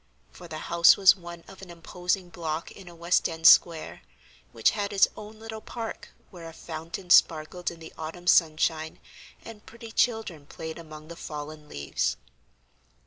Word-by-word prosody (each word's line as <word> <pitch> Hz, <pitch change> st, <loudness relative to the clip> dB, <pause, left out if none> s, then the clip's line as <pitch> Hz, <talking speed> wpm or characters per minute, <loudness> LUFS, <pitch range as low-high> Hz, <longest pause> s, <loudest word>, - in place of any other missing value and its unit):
for 175 Hz, -, -12 dB
the 155 Hz, -, -7 dB
house 170 Hz, +1 st, +5 dB
was 195 Hz, -2 st, +7 dB
one 170 Hz, -2 st, -11 dB
of 195 Hz, 0 st, -14 dB
an 190 Hz, -, -11 dB
imposing 175 Hz, +2 st, -3 dB
block 165 Hz, -2 st, -5 dB
in 195 Hz, -2 st, -13 dB
a 170 Hz, -, -14 dB
West 170 Hz, +2 st, +1 dB
End 165 Hz, 0 st, -7 dB
square, 165 Hz, -1 st, +5 dB, 0.5 s
which 115 Hz, -, +2 dB
had 205 Hz, -1 st, -3 dB
its 195 Hz, -1 st, +5 dB
own 215 Hz, +1 st, -11 dB
little 220 Hz, 0 st, -8 dB
park 230 Hz, -1 st, -7 dB, 0.2 s
where 170 Hz, -4 st, -10 dB
a -, -, -13 dB
fountain 165 Hz, +3 st, -7 dB
sparkled 165 Hz, +2 st, +3 dB
in 170 Hz, -, -12 dB
the 160 Hz, -, -11 dB
autumn 165 Hz, +3 st, -7 dB
sunshine, 160 Hz, -2 st, +2 dB, 0.5 s
and 225 Hz, -2 st, -12 dB
pretty 230 Hz, -1 st, -11 dB
children 220 Hz, -12 st, -1 dB
played 160 Hz, +2 st, -8 dB
among 155 Hz, -1 st, -11 dB
the 170 Hz, -, -9 dB
fallen 150 Hz, -1 st, -8 dB
leaves. 70 Hz, -4 st, -2 dB
170 Hz, 165 wpm, -27 LUFS, 160-190 Hz, 0.5 s, was